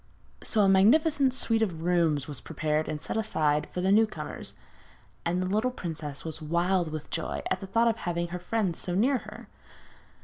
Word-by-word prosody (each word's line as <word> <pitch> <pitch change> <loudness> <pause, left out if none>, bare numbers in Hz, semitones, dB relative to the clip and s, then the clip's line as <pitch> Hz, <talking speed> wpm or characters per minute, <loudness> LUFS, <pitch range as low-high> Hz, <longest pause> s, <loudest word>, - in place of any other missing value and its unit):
So 215 - +1
a 200 - +5
magnificent 270 +9 +4
suite 225 -3 +1
of 170 -7 -1
rooms 165 -5 +2
was 145 -4 -5
prepared 155 0 -1
and 155 -1 -3
set - - -4
aside 150 -9 +1
for 180 - -4
the 190 +1 +2
new 220 +2 +5
comers, - - -6 0.7
and 175 +2 0
the 185 - 0
little 215 +6 +1
princess 155 - -6
was 160 0 -4
wild 170 +2 +1
with 155 -1 -6
joy 165 - -3
at - - +1
the 195 - -7
thought 230 +4 +2
of 225 -1 +1
having 170 -2 -2
her 180 +1 -4
friends 185 -1 -1
so 180 - -2
near 250 +7 +3
her. - - -11
180 Hz, 195 wpm, -28 LUFS, 160-220 Hz, 0.7 s, a